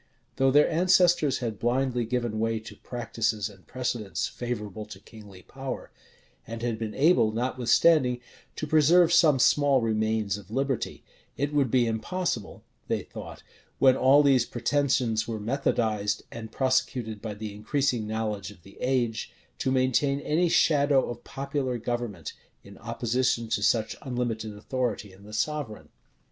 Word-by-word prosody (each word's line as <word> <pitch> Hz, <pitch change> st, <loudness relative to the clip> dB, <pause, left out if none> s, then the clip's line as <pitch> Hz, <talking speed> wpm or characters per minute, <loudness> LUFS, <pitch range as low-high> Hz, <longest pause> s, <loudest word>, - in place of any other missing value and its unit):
Though 135 Hz, 0 st, +4 dB
their 145 Hz, +3 st, +5 dB
ancestors 175 Hz, -3 st, +3 dB
had 110 Hz, -4 st, -4 dB
blindly 125 Hz, +1 st, 0 dB
given 120 Hz, -2 st, -2 dB
way 115 Hz, 0 st, 0 dB
to 110 Hz, -, -11 dB
practices 115 Hz, -3 st, -2 dB
and 95 Hz, -2 st, -20 dB
precedents 115 Hz, -7 st, -3 dB
favorable 110 Hz, -4 st, -5 dB
to -, -, -10 dB
kingly 100 Hz, -4 st, -14 dB
power, 135 Hz, -1 st, -7 dB, 0.6 s
and 115 Hz, 0 st, -6 dB
had 115 Hz, -2 st, -2 dB
been 110 Hz, -2 st, -4 dB
able, 145 Hz, -7 st, +4 dB
notwithstanding, 125 Hz, +3 st, +2 dB, 0.4 s
to -, -, -4 dB
preserve 160 Hz, +3 st, +5 dB
some 160 Hz, -5 st, +5 dB
small 140 Hz, +1 st, +4 dB
remains 110 Hz, -2 st, 0 dB
of 100 Hz, -2 st, -15 dB
liberty, 135 Hz, +1 st, -2 dB, 0.3 s
it 145 Hz, +2 st, -1 dB
would 140 Hz, -4 st, +2 dB
be 125 Hz, 0 st, +3 dB
impossible, 115 Hz, -, -3 dB, 0.2 s
they -, -, -1 dB
thought, -, -, -10 dB, 0.3 s
when 130 Hz, -1 st, +5 dB
all 135 Hz, +3 st, +5 dB
these 135 Hz, -4 st, +4 dB
pretensions 125 Hz, -4 st, 0 dB
were 115 Hz, -2 st, -4 dB
methodised, 110 Hz, -3 st, -1 dB
and 110 Hz, -1 st, -8 dB
prosecuted 130 Hz, -5 st, -1 dB
by 110 Hz, -2 st, -5 dB
the 105 Hz, 0 st, -6 dB
increasing 120 Hz, +1 st, -1 dB
knowledge 110 Hz, -2 st, -3 dB
of 95 Hz, -5 st, -15 dB
the 95 Hz, -, -16 dB
age, 120 Hz, -4 st, -1 dB, 0.3 s
to -, -, 0 dB
maintain 130 Hz, +2 st, +2 dB
any 165 Hz, +4 st, +1 dB
shadow 140 Hz, -5 st, +3 dB
of 120 Hz, 0 st, -9 dB
popular 135 Hz, -2 st, -3 dB
government, 115 Hz, -9 st, -4 dB, 0.3 s
in 100 Hz, 0 st, -13 dB
opposition 115 Hz, 0 st, -1 dB
to -, -, 0 dB
such 110 Hz, -2 st, +1 dB
unlimited 120 Hz, -4 st, -3 dB
authority 110 Hz, -4 st, -3 dB
in 95 Hz, +2 st, -17 dB
the 105 Hz, -, -12 dB
sovereign. 115 Hz, 0 st, -3 dB
120 Hz, 145 wpm, -27 LUFS, 110-135 Hz, 0.6 s, their